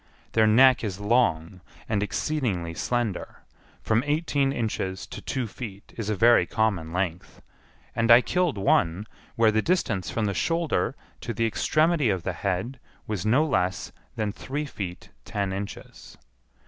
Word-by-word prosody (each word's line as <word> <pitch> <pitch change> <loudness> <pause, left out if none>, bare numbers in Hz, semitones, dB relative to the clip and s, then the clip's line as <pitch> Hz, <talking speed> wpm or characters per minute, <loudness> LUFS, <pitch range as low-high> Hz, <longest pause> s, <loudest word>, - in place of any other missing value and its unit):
Their 110 -1 +4
neck 130 +4 +6
is 100 -3 -3
long, 95 -5 +1 0.3
and 105 -2 0
exceedingly 105 - -2
slender, 110 +5 -3 0.4
from 110 +2 +2
eighteen 145 -2 +1
inches 105 -6 -3
to - - -9
two 130 -2 -2
feet 105 -3 -9
is 110 -3 -4
a 105 - +1
very 120 +4 +5
common 100 -8 0
length, 90 -1 -4 0.5
and 115 0 +1
I 120 +1 +9
killed 180 - 0
one, 95 0 +2 0.3
where 115 -1 +4
the 110 +1 +2
distance 115 - 0
from 115 - -1
the 100 - 0
shoulder 165 - 0 0.2
to 115 - -5
the 115 - +1
extremity 155 +4 +2
of 95 -4 -1
the 95 - -2
head 100 +8 -3 0.3
was 105 -1 -3
no 135 +8 +4
less 95 - -1 0.2
than 105 -2 -1
three 140 +7 -4
feet 95 -10 -7
ten 100 - -2
inches. 100 +1 -8
110 Hz, 150 wpm, -26 LUFS, 95-125 Hz, 0.5 s, I